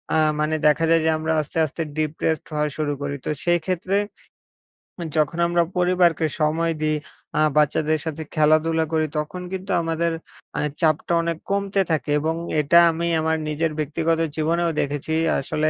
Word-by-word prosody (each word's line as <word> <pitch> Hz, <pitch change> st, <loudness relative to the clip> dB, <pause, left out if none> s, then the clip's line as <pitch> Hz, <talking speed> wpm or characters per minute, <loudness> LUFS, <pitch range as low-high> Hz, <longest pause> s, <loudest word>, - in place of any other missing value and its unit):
আ -, -, +4 dB, 0.2 s
মানে 155 Hz, +1 st, +1 dB
দেখা 150 Hz, +2 st, +3 dB
যায় 165 Hz, 0 st, +4 dB
যে, -, -, +4 dB
আমরা 160 Hz, +1 st, -1 dB
আস্তে, 150 Hz, +2 st, -8 dB
আস্তে 155 Hz, +2 st, -6 dB, 0.2 s
ডিপ্রেসড 155 Hz, +2 st, -1 dB
হওয়া 150 Hz, 0 st, +1 dB
শুরু 150 Hz, -2 st, -1 dB
করি। 140 Hz, 0 st, -3 dB
তো -, -, -2 dB, 0.2 s
সেক্ষেত্রে 175 Hz, +3 st, +1 dB, 1.2 s
যখন 155 Hz, +3 st, +1 dB
আমরা 175 Hz, 0 st, +2 dB
পরিবারকে 180 Hz, -2 st, +3 dB, 0.2 s
সময় 165 Hz, +2 st, +1 dB
দিই, 155 Hz, 0 st, +1 dB, 0.4 s
আ -, -, +4 dB, 0.2 s
বাচ্চাদের 150 Hz, +1 st, +2 dB
সাথে 160 Hz, 0 st, -4 dB
খেলাধুলা 155 Hz, +1 st, +3 dB
করি, 155 Hz, 0 st, +2 dB
তখন 150 Hz, +4 st, -3 dB
কিন্তু 190 Hz, +1 st, -4 dB
আমাদের 165 Hz, 0 st, 0 dB, 0.5 s
আ -, -, 0 dB, 0.2 s
চাপটা 160 Hz, +1 st, +1 dB
অনেক 165 Hz, -1 st, -2 dB
কমতে 200 Hz, 0 st, +1 dB
থাকে 150 Hz, -2 st, 0 dB
এবং 160 Hz, +2 st, -1 dB, 0.3 s
এটা 170 Hz, +4 st, +5 dB
আমি 170 Hz, +1 st, -2 dB
আমার 160 Hz, 0 st, +1 dB
নিজের 155 Hz, +1 st, 0 dB
ব্যক্তিগত 160 Hz, +2 st, 0 dB, 0.2 s
জীবনেও 165 Hz, +2 st, +1 dB
দেখেছি। 145 Hz, +2 st, -2 dB, 0.3 s
আসলে 155 Hz, +3 st, 0 dB
160 Hz, 155 wpm, -23 LUFS, 155-170 Hz, 1.2 s, এটা